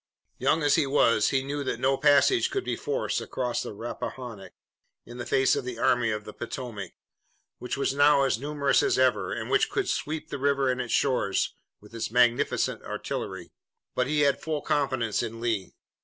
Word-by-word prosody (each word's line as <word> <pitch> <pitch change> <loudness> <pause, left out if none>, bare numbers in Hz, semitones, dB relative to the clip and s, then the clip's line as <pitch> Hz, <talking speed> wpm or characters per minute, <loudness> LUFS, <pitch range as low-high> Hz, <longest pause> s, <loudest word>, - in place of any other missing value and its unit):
Young 160 - +2
as 145 - +4
he 155 -4 +3
was 115 -6 +3
he 135 -1 +1
knew 140 +1 -3
that 130 - -3
no 135 +1 +2
passage 145 - +4
could 395 -1 -2
be - - -1
forced 450 +3 -2
across 125 -2 -2
the - - -5
Rappahannock 115 0 -7 0.5
in 120 +1 -10
the 120 - -5
face 135 +1 +3
of 140 - -2
the 125 -2 -5
Army 120 0 +2
of 105 -1 -2
the 105 - -10
Potomac, 115 -6 -6 0.7
which 125 - -4
was 140 -1 0
now 145 0 +5
as 130 -4 +1
numerous 140 0 +1
as 395 -1 +1
ever, - - +2
and - - -4
which - - +3
could 395 -1 -1
sweep 155 - -3
the 140 - -5
river 140 -1 +2
and 125 0 -2
its 120 - -5
shores 125 -8 +1 0.3
with 105 +2 -17
its 115 - -3
magnificent 125 +3 +2
artillery. 95 -3 -5 0.4
But 125 0 0
he 150 +1 +1
had 140 -1 +2
full 155 -2 -3
confidence 130 -7 0
in 115 +1 -5
Lee. 115 -5 -2
130 Hz, 190 wpm, -27 LUFS, 115-145 Hz, 0.7 s, now